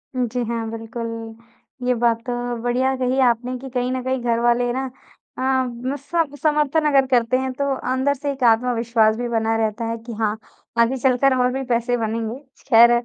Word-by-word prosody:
उ, 250 -1 +1
जी। 245 +1 -2
हाँ, 230 -1 -3
बिल्कुल। 230 0 -6 0.5
ये 250 - +4
बात 230 -1 +2
तो 245 - -1 0.3
बढ़िया 255 +2 +1
कही 255 +1 0
आपने 245 +2 0
कि 265 +1 -9
कहीं 250 0 -1
न 255 0 -2
कहीं 260 0 -1
घर 235 -1 +1
वाले 240 +1 +2
ना 265 +1 -2 0.5
अम 260 0 -1
सम 290 +1 -2
समर्थन 300 0 +2
अगर 275 -2 +4
करते 245 +1 +3
हैं 260 0 -2
तो 280 +1 -1 0.2
अंदर 260 +2 +2
से 285 +1 -3
एक 265 -2 -5
आत्मविश्वास 230 -1 +3
भी 245 - -2
बना 225 -1 +1
रहता 225 +1 -1
है 230 - -2
कि 235 - -6
हाँ, 215 0 -1 0.4
आगे 240 +3 +3
चलकर 260 +1 +3
और 250 - +2
भी 270 +1 -2
पैसे 240 +1 +1
बनेंगे। 225 +2 -3 0.3
खैर 235 -1 +7
245 Hz, 190 wpm, -21 LUFS, 230-265 Hz, 0.5 s, खैर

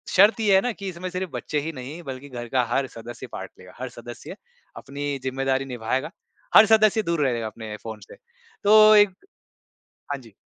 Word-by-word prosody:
शर्त 205 +4 +6
ये 200 -3 +4
है 190 - +5
ना 245 - -1
कि 200 -3 -6
इसमें 180 +1 -6
सिर्फ़ 180 -3 -4
बच्चे 135 +4 -3
ही 160 +2 -4
नहीं 140 +6 -8
बल्कि 135 0 -8
घर 120 -2 -7
का 130 -2 +2
हर 135 +1 +1
सदस्य 115 0 -9
पार्ट - - -7
लेगा। - - -14
हर - - -4
सदस्य - - -10 0.4
अपनी 140 +1 -4
ज़िम्मेदारी 135 +1 -1
निभाएगा, 130 +5 -3 0.4
हर 220 - +10
सदस्य 215 0 +4
दूर 170 -3 -1
रहेगा 115 -3 -1
अपने 110 -1 -8
फ़ोन 110 -1 -7
से। - - -11 0.5
तो 215 +1 +7
एक 205 -1 +7 1.0
हाँ 140 - -1
जी। 115 -4 -17
140 Hz, 190 wpm, -24 LUFS, 125-190 Hz, 1.0 s, हर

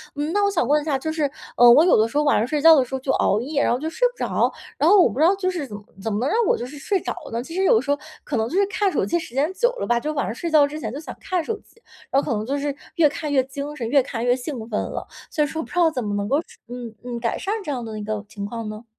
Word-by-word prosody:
嗯， 295 +2 -2
那 410 - +2
我 400 - +2
想 320 - 0
问 295 +2 +4
一 - - -8
下 290 -4 +1
就 315 +4 -3
是， 310 -3 0 0.3
呃， 245 0 +8
我 295 +6 +7
有 360 - +5
的 220 +1 +3
时 230 - -13
候 300 - +3
晚 290 - +3
上 220 - +2
睡 295 +2 -1
觉 325 +1 +9
的 265 -4 +3
时 260 - -13
候 265 - -1
就 265 +1 -1
熬 205 - +2
夜， 285 +3 -1
然 - - +2
后 245 - -1
就 315 +3 -3
睡 - - +2
不 - - -20
着， - - +1 0.3
然 - - +2
后 410 - +7
我 345 - +5
不 230 - -6
知 315 - +5
道 370 +4 +5
就 380 -1 -1
是 345 -6 -3
怎 210 - -8 0.3
怎 225 - -1
么 205 - 0
能 255 +5 0
让 435 - +1
我 - - +4
就 - - -5
是 280 +4 -10
睡 385 +7 0
着 - - -4 0.2
呢？ 230 +1 -2
其 330 +7 -9
实 380 - +1
有 225 -12 +5
时 275 - -9
候 285 - +3 0.3
可 280 - -2
能 220 0 0
就 335 - -4
是 400 - +4
看 405 -1 0
手 - - 0
机 345 - 0
时 325 -7 -7
间 285 +6 +1
久 485 +5 +2
了 - - -2
吧， 240 0 +2
就 305 +5 -3
晚 280 - -1
上 - - -3
睡 335 - -3
觉 300 -2 +6
之 300 +2 -7
前 225 -5 -5
就 280 - -5
想 315 - -8
看 370 -4 -1
手 445 +5 -3
机， 460 - -26 0.3
然 275 - +4
后 - - -5
可 - - +1
能 210 - -3
就 275 +4 -1
是 285 -1 -2 0.2
越 325 -4 +5
看 300 0 -5
越 265 -2 +4
精 280 +2 -6
神、 235 -6 -4
越 280 +2 +5
看 235 -2 -4
越 245 0 +4
兴 250 -3 -6
奋 215 - -1
了。 - - -5 0.2
所 305 - +1
以 - - 0
说 320 +3 -4
不 - - -12
知 - - -10
道 345 -2 +5
怎 260 -6 -3
么 205 -1 -3
能 200 0 -2
够 280 - +3
处 - - -19
嗯 240 -2 -7
嗯 245 -1 -5
改 230 -1 -1
善 400 - -2
这 300 - -4
样 250 -3 -3
的 220 -1 -6
一 - - -5
个 210 0 -3
情 200 -1 -6
况 225 +1 -5
呢？ 215 +2 -8
285 Hz, 375 characters per minute, -23 LUFS, 240-320 Hz, 0.3 s, 觉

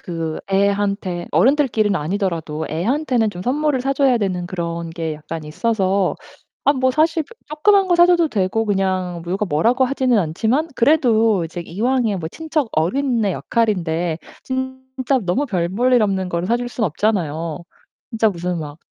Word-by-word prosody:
그 165 -2 -4
애한테 200 -2 0
어른들끼리는 235 -7 +3
아니더라도 165 -2 -2
애한테는 235 - 0
좀 180 -3 -8
선물을 285 +3 0
사 270 +2 0
줘야 270 -2 +3
되는 185 -5 -2
그런 170 -2 -4
게 165 -1 -4
약간 155 +1 -7
있어서 195 +3 0 0.5
아 285 - +5
뭐 260 -2 +1
사실 320 +2 +2
그 470 - -16
쪼끄만 385 +6 +3
거 350 - +3
사 345 0 +7
줘도 345 -3 +3
되고 205 +1 0
그냥 185 -4 -1
누가 190 +4 -1
뭐라고 225 - +2
하지는 255 -3 +1
않지만 220 - 0
그래도 230 - +3
이제 165 +2 -6
이왕에 225 +5 0
뭐 160 -3 -4
친척 310 - -2
어른의 225 - +1
역할인데 175 -8 -1 0.3
진짜 260 0 -2
너무 215 +12 0
별 180 -8 -1
볼 240 +8 +1
일 245 - +5
없는 190 -3 0
거를 170 0 -2
사 235 +4 +2
줄 245 0 -4
수 240 -2 -2
없잖아요 165 -4 -1 0.5
진짜 225 -2 +2
무슨 180 -2 -3
막 150 0 -8
205 Hz, 330 characters per minute, -20 LUFS, 175-260 Hz, 0.5 s, 사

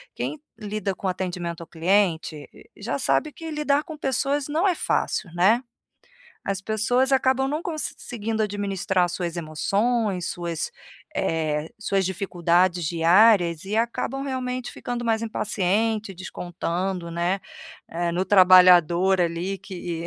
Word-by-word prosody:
quem 305 - -4 0.2
lida 205 -2 -3
com 190 - -4
atendimento 175 -2 -3
ao 170 - -9
cliente 165 -4 0
e - - -16
e - - -17
já 235 - -1
sabe 300 +3 +1
que 325 -1 -7
lidar 295 -1 +1
com 315 -2 -8
pessoas 275 0 0
não 320 +6 +1
é 370 - +3
fácil, 190 - -1
né? 210 +7 +4 0.8
As 195 -1 -2
pessoas 245 +6 +1
acabam 265 0 +2
não 300 +4 -2
conseguindo 230 - -3
administrar 195 -2 0
as 175 - -6
suas 175 -2 -3
emoções, 195 +5 0
suas, 170 -2 -4 0.5
eh, 155 -1 -1
suas 195 -2 0
dificuldades 180 -1 +1
diárias 170 +1 +4
e 210 - -2
acabam, 235 +4 -1
realmente, 255 -2 -3
ficando 240 -1 -5
mais 225 -1 +1
impaciente, 215 0 -1
descontando, 180 0 -4
né, 175 +3 -1 0.5
eh, 170 0 -1
no 180 +2 0
trabalhador 185 -1 +6
ali 175 +3 -1
que 175 -4 -6
195 Hz, 135 wpm, -24 LUFS, 175-230 Hz, 0.8 s, trabalhador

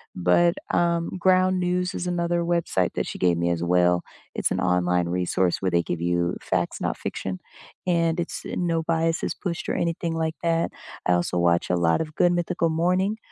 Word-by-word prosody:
But, 90 - +3 0.2
um, 170 -1 +1
Ground 185 0 +3
News 180 +1 0
is 180 - -4
another 175 -1 0
website 170 - 0
that - - -1
she - - -6
gave 90 -2 +3
me 85 0 +1
as 85 -1 -2
well. 90 0 +3 0.3
It's - - 0
an - - -1
online 90 -1 +1
resource 90 +1 0
where 95 -2 0
they 85 0 +2
give 85 -1 -4
you 85 0 0
facts, - - -2
not - - -1
fiction, 90 -1 -4 0.5
and 170 -1 +1
it's 170 - -4
eh, - - -5
no 170 -2 0
bias 165 0 0
is - - -2
pushed 170 -4 -4
or - - 0
anything 165 0 -1
like 160 0 -1
that. 165 0 +1 0.3
I 90 - +3
also 90 0 0
watch 85 0 +2
a 90 - +2
lot 85 -1 +2
of 155 -1 -6
Good 175 - +4
Mythical 175 -1 0
Morning 180 +6 +1
165 Hz, 200 wpm, -24 LUFS, -, 0.5 s, Good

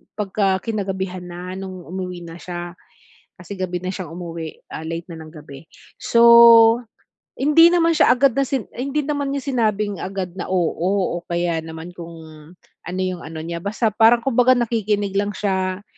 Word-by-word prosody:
pagka 195 -2 0
kinagabihan 190 -4 -4
na 180 +1 -7
nung 185 -2 -8
umuwi 180 0 -6
na 165 0 -10
siya. 175 -1 -7 0.7
Kasi 195 +3 -8
gabi 180 -1 -3
na 185 - -5
siyang 185 -5 -7
umuwi, 165 -2 -7
ah, 160 - -6
late 165 +2 -5
na 165 - -8
ng 155 -1 -11
gabi. 150 -2 -12 0.4
So, 235 - +2 1.2
hindi 300 +4 +6
naman 340 -1 +3
siya 245 - +5
agad 270 +2 +3
na 275 - +2
si 265 -2 -2 0.2
hindi 275 +4 -1
naman 285 -1 -2
niya 280 - -3
sinabing 215 -5 0
agad 185 -2 -5
na, - - -4
oo, 185 +1 0
o - - -13
kaya 170 -1 -1
naman 160 +1 -9
kung 170 -1 -9 0.7
ano 180 +1 -4
yung 185 -2 -3
ano 160 0 -7
niya, 170 +1 -5
basta 215 +3 -1
parang 225 +3 +4
kumbaga 255 0 +3
nakikinig 215 -4 -1
lang 205 0 -1
siya, 190 -1 -2
190 Hz, 170 wpm, -21 LUFS, 175-225 Hz, 1.2 s, hindi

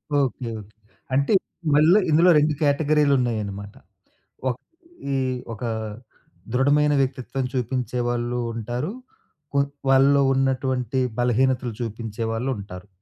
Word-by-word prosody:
Okay. 130 -3 0
Okay. - - -7 0.5
అంటే 140 +9 +2 0.4
మళ్ళ 155 +4 +6 0.2
ఇందులో 165 +4 +5
2 150 0 +3
కేటగరీలున్నాయనమాట. 135 -9 +1 0.8
ఒక్ 125 - -4 0.5
ఈ - - +1 0.4
ఒకా 115 +2 -4 0.8
దృఢమైన 145 +3 +3
వ్యక్తిత్వం 135 0 -2
చూపించేవాళ్ళూ 120 -1 -1
ఉంటారు. 120 - -3 0.6
కొ 140 - +3 0.3
వాళ్ళలో 135 +1 +5
ఉన్నటువంటి 130 -1 0 0.2
బలహీనతలు 125 0 +1
చూపించేవాళ్ళుంటారు. 115 -3 -4
130 Hz, 90 wpm, -23 LUFS, 120-140 Hz, 0.8 s, మళ్ళ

